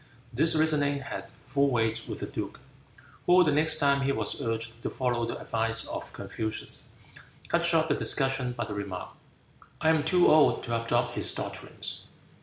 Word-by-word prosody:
This 160 +7 +4
reasoning 145 -3 +2
had 135 - -7
full 140 +2 +2
weight 115 -2 0
with - - -5
the - - -2
duke, - - -6 0.7
who 180 +1 +7
the 155 - +2
next 155 +2 +3
time 140 -2 +3
he 135 0 +1
was 140 - -1
urged 115 -1 -3
to - - -3
follow 120 -2 -1
the - - -4
advice 115 0 +1
of - - -6
Confucius, 110 0 -5 0.6
cut 170 0 +2
short 165 -2 +3
the 150 - +2
discussion 135 -3 +1
by 120 -1 -3
the 105 - -6
remark, 100 -3 -5 0.7
"I 160 - +2
am 160 -2 +3
too 175 +3 +4
old 155 -1 +5
to 115 -1 -2
adopt 115 - 0
his - - +1
doctrines." - - -6
135 Hz, 175 wpm, -28 LUFS, 115-155 Hz, 0.7 s, who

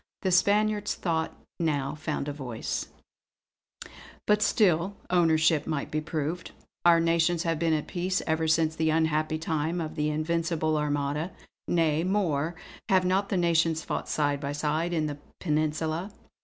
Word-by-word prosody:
The 190 - +1
Spaniard's 210 +3 +2
thought 160 -2 -2 0.2
now 145 -5 0
found 150 -1 -3
a 145 - -2
voice: 125 -6 -4 1.4
"But 210 0 +3
still 195 -3 +2 0.2
ownership 160 -3 +3
might 150 -2 -2
be 155 0 0
proved. 155 +2 -3 0.3
Our 170 -1 +6
nations 165 0 +2
have 165 -2 0
been 165 -1 +2
at 155 -1 0
peace 185 +1 -1
ever 160 0 0
since 160 0 +2
that 160 0 +1
unhappy 155 0 +1
time 160 +1 -1
of 160 -1 -4
the 150 -1 0
Invincible 160 0 0
Armada. 150 +2 -1 0.4
Nay 165 -2 +2
more, 175 -5 0 0.3
have 185 -1 +4
not 190 +2 +1
the 195 - 0
nations 165 -2 +2
fought - - -4
side 145 -2 +1
by 140 0 -3
side 155 +3 -1
in 160 -3 0
the 145 -1 -4 0.2
Peninsula! 155 +3 -1
160 Hz, 150 wpm, -28 LUFS, 155-175 Hz, 1.4 s, Our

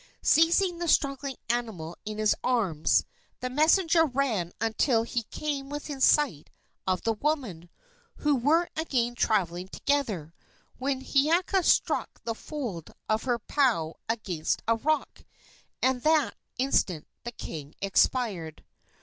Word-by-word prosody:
Seizing 340 +2 +4
the 345 - -2
struggling 275 -3 +1
animal 220 -9 -2
in 215 0 -5
his 215 -1 +3
arms, 200 -12 +2 0.3
the 255 - -4
messenger 325 +4 +4
ran 250 - 0
until 225 +1 +2
he 235 -1 -3
came 285 -3 -3
within 290 -1 -6
sight 265 - +3 0.4
of 185 -1 0
the 225 - +1
women, 220 - -2 0.5
who 295 -1 +1
were 310 +7 +3
again 255 -7 0
traveling 185 -6 0
together, 210 - -1 0.5
when 265 0 -1
Hiiaka 335 +8 +2
struck - - +1
the 230 - -2
fold 225 - -6 0.2
of 215 +2 0
her 245 -2 +1
pau 230 - +1 0.2
against 190 -9 -2
a 230 - +4
rock, 300 +6 -1 0.6
and 260 -1 +2
that 310 -1 +3 0.2
instant 195 - +1 0.2
the 240 - -5
king 155 -9 -8
expired. 195 -5 0
245 Hz, 125 wpm, -28 LUFS, 205-290 Hz, 0.6 s, Seizing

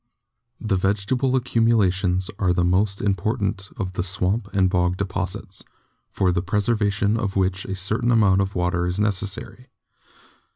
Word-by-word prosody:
The 105 -4 0
vegetable 105 +8 0
accumulations 100 -7 +1
are 95 -3 +2
the 90 - +1
most 95 +3 +1
important 100 0 -1
of 95 -4 -4
the 90 - -2
swamp 95 +3 -1
and 95 -2 +2
bog 90 -1 +1
deposits, 95 +1 -4 0.5
for 95 -2 +1
the 90 0 0
preservation 105 +1 0
of 105 -4 -3
which 95 0 0
a 95 - -4
certain 110 +6 +1
amount 100 -5 +4
of 95 +1 -3
water 90 0 0
is 90 +2 -2
necessary. 105 +4 -2
95 Hz, 140 wpm, -23 LUFS, 95-105 Hz, 0.5 s, amount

